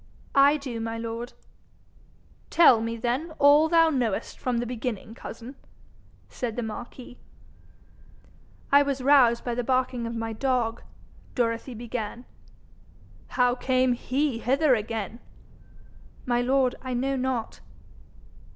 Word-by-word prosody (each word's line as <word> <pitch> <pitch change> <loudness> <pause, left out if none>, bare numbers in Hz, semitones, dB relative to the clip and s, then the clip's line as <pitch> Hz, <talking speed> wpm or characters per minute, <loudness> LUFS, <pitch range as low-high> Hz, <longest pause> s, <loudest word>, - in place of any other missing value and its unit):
'I 280 +2 +5
do, 260 -5 -6
my 225 0 -4
lord.' 230 +2 -5 1.2
'Tell 260 -9 +6
me, 230 0 -3
then, 255 +8 -2
all 295 +3 +5
thou 330 -1 +5
knowest 240 -8 -2
from 250 -2 -1
the 240 - -1
beginning, 235 -3 -5
cousin,' 235 +2 -9 0.7
said 235 -3 -5
the 245 - -3
marquis. 240 +3 -8 1.5
'I 280 +1 +7
was 275 -2 -2
roused 255 -4 +5
by 240 - -2
the 245 +1 -2
barking 255 -1 0
of 230 - -5
my 225 0 -3
dog,' 240 -1 -1 0.5
Dorothy 235 0 -1
began. 235 0 -5 1.0
'How 250 -1 +2
came 255 0 +1
HE 260 +1 -1
hither 270 +4 +2
again?' 220 -1 -3 1.1
'My 240 -1 +1
lord, 255 0 +2
I 255 -1 -4
know 270 +3 0
not.' 255 -3 -3
245 Hz, 125 wpm, -26 LUFS, 230-265 Hz, 1.5 s, I